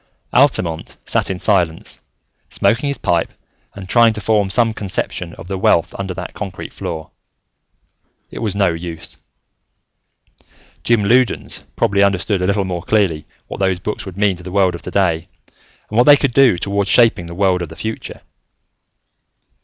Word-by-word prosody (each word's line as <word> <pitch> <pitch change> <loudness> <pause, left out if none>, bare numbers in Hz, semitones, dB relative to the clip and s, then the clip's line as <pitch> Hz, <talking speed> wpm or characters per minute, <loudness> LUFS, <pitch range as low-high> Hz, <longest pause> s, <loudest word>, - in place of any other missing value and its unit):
Altamont 90 - +1
sat - - 0
in 95 - -2
silence, 90 -5 0 0.5
smoking 125 +6 +1
his 140 - -1
pipe 85 -4 0 0.4
and 100 -2 -8
trying 115 +2 +5
to 110 - -4
form 105 -1 +1
some 115 +2 +2
conception 90 -4 -4
of 85 - -11
the 95 0 -4
wealth 85 -3 +2
under 95 -1 -3
that 90 -2 -6
concrete 95 -4 -7
floor. 80 -2 -6 1.2
It - - -7
was 105 -4 -2
no 100 -2 +3
use. 85 -1 -7 1.7
Jim 115 -3 +2
Loudons 125 +4 +1
probably 100 0 +1
understood 100 0 +1
a 90 - 0
little 100 0 +1
more 90 -2 -3
clearly 90 -5 0 0.2
what - - -8
those 95 -2 +1
books 105 +4 -4
would 95 -1 -9
mean 100 -2 +2
to 90 - -13
the 90 - -7
world 95 -2 +2
of 85 - -7
today, 90 -3 0 0.6
and 110 - -3
what 125 - +6
they 145 -1 +8
could 140 -4 0
do 130 -8 +5
toward 100 +2 -1
shaping 115 -7 +4
the 85 - -8
world 95 -1 +2
of 85 - -4
the 80 - -10
future. 110 +4 -6
95 Hz, 165 wpm, -18 LUFS, 90-110 Hz, 1.7 s, they